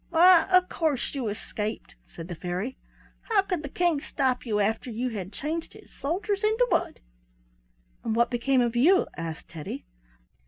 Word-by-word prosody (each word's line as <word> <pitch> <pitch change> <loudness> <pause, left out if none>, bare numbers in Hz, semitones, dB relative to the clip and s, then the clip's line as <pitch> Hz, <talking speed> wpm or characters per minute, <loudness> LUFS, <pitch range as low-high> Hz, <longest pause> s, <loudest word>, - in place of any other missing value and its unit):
"Why, 345 +1 +6
of 365 0 +5
course 310 -6 -1
you 265 -5 -2
escaped," 215 +1 -4
said 165 -1 -9
the 180 - -5
fairy. 180 +9 -4 0.5
"How 415 -4 +4
could 365 -5 -2
the 290 - -6
King 340 -2 +1
stop 260 -5 -1
you 210 -2 +1
after 220 +4 0
you 240 +3 -2
had 195 -4 -5
changed 315 +9 -4
his - - -16
soldiers 385 +8 -2
into 440 +3 +3
wood?" - - 0 1.0
"And 220 - -1
what 235 +2 +3
became 250 +2 +2
of 240 -1 0
you?" 340 +11 +5
asked 165 -1 -6
Teddy. 155 - -7
260 Hz, 165 wpm, -27 LUFS, 215-340 Hz, 1.0 s, Why